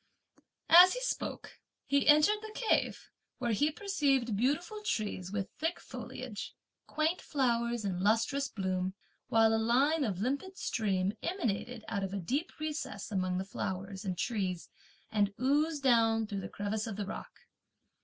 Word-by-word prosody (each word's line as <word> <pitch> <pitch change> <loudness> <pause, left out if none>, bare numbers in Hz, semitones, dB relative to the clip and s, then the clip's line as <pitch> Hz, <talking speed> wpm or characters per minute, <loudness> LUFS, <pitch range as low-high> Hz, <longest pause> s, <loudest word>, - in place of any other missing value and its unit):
As 360 +2 +10
he - - -4
spoke, - - -4 0.3
he 280 0 +2
entered 305 +8 +6
the 435 0 -8
cave, 455 - 0 0.3
where 240 -2 -1
he 290 +8 +2
perceived 285 - +1
beautiful 315 - 0
trees 210 - -2
with 200 -2 -3
thick 330 +3 -1
foliage, 250 -3 -7 0.3
quaint 315 +3 0
flowers 235 -5 0
in 185 -3 -1
lustrous 230 +7 +2
bloom, 185 -1 -2 0.3
while 225 0 +4
a 225 - +2
line 275 +7 +3
of 200 -8 -2
limpid 280 - -2
stream 195 -3 0
emanated 240 - -2
out 200 -2 -2
of 195 +1 -3
a - - -2
deep 275 - -2
recess 300 -9 -4
among 185 -2 0
the 190 - -2
flowers 190 0 -4
and 185 -3 -3
trees, 190 -7 -2 0.4
and 205 -2 +1
oozed 290 +3 +1
down 225 -3 +4
through 200 -2 -4
the - - -6
crevice 210 +2 -3
of 220 - -4
the 205 0 -3
rock. - - -8
230 Hz, 155 wpm, -32 LUFS, 200-295 Hz, 0.4 s, As